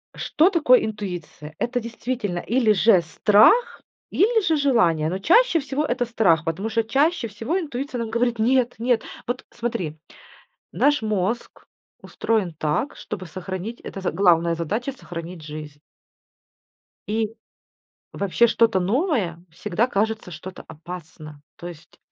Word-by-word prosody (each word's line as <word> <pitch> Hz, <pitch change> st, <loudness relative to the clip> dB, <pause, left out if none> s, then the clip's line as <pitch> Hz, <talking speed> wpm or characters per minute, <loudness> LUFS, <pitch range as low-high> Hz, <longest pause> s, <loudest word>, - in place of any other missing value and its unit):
Что 325 Hz, +5 st, +2 dB
такое 295 Hz, -9 st, +4 dB
интуиция? 175 Hz, -7 st, -6 dB
Это 245 Hz, +1 st, -1 dB
действительно 230 Hz, -5 st, -4 dB
или 230 Hz, +2 st, +2 dB
же 195 Hz, -1 st, +5 dB
страх, 215 Hz, -, +4 dB, 0.3 s
или 445 Hz, +3 st, +3 dB
же 320 Hz, -2 st, +2 dB
желание, 200 Hz, -, +2 dB
но 185 Hz, +3 st, -3 dB
чаще 345 Hz, -, +4 dB
всего 280 Hz, +2 st, -2 dB
это 245 Hz, -2 st, 0 dB
страх, 195 Hz, -9 st, +2 dB
потому 170 Hz, +5 st, -3 dB
что 230 Hz, 0 st, +1 dB
чаще 275 Hz, +4 st, +1 dB
всего 225 Hz, -, -2 dB
интуиция 275 Hz, -5 st, -4 dB
нам 230 Hz, -1 st, -3 dB
говорит: 235 Hz, +1 st, 0 dB
"Нет, 245 Hz, +2 st, +2 dB
нет." 235 Hz, 0 st, +1 dB, 0.2 s
Вот, 245 Hz, +2 st, -4 dB
смотри, 185 Hz, -10 st, -4 dB, 0.8 s
наш 290 Hz, -3 st, +2 dB
мозг 215 Hz, +2 st, -2 dB, 0.3 s
устроен 210 Hz, -7 st, -1 dB
так, 155 Hz, -, -1 dB
чтобы 190 Hz, -3 st, -7 dB
сохранить 185 Hz, +6 st, -6 dB
это 195 Hz, -, -7 dB
з 190 Hz, -, -1 dB
главная 170 Hz, -3 st, +3 dB
задача- 210 Hz, -, -3 dB
сохранить 175 Hz, -8 st, -8 dB
жизнь. 150 Hz, -1 st, -8 dB, 1.3 s
И 220 Hz, 0 st, -1 dB, 0.8 s
вообще 200 Hz, +4 st, +2 dB
что-то 225 Hz, -3 st, +3 dB
новое 200 Hz, -, 0 dB
всегда 210 Hz, +7 st, -1 dB
кажется 220 Hz, -3 st, -1 dB
что-то 180 Hz, +3 st, -9 dB
опасно, 155 Hz, -2 st, -10 dB, 0.2 s
то 175 Hz, -, -8 dB
есть 165 Hz, -1 st, -12 dB
215 Hz, 135 wpm, -23 LUFS, 175-245 Hz, 1.3 s, же